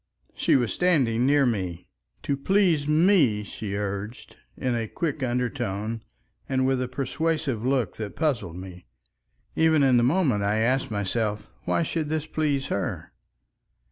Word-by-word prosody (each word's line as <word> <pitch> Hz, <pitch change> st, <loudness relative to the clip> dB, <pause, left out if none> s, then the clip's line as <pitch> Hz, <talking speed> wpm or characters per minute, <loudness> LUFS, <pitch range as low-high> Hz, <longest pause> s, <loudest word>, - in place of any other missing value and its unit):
She -, -, +2 dB
was 120 Hz, -4 st, +1 dB
standing 130 Hz, -9 st, +2 dB
near 145 Hz, 0 st, +4 dB
me. 90 Hz, -7 st, -2 dB, 0.4 s
"To 140 Hz, -, 0 dB
please 165 Hz, -1 st, +2 dB
me," 150 Hz, -, +4 dB
she 100 Hz, 0 st, -6 dB
urged, 100 Hz, +3 st, -5 dB, 0.2 s
in 130 Hz, -2 st, -1 dB
a 115 Hz, -2 st, -1 dB
quick 155 Hz, +3 st, -3 dB
undertone, 115 Hz, -3 st, -2 dB, 0.5 s
and 130 Hz, -1 st, +1 dB
with 130 Hz, -1 st, +1 dB
a 130 Hz, -, -1 dB
persuasive 140 Hz, -2 st, -2 dB
look 125 Hz, -6 st, 0 dB
that 105 Hz, -2 st, -5 dB
puzzled 135 Hz, -, -1 dB
me. 90 Hz, -1 st, -10 dB, 0.7 s
Even 160 Hz, -2 st, +4 dB
in 130 Hz, -2 st, +5 dB
the 120 Hz, -, +4 dB
moment 135 Hz, -, +2 dB
I 100 Hz, +2 st, +1 dB
asked 125 Hz, +4 st, +1 dB
myself 105 Hz, 0 st, -2 dB
why -, -, +1 dB
should 155 Hz, -1 st, -2 dB
this 155 Hz, -1 st, -1 dB
please 150 Hz, -4 st, -1 dB
her? 100 Hz, -2 st, -3 dB
125 Hz, 145 wpm, -25 LUFS, 105-150 Hz, 0.7 s, in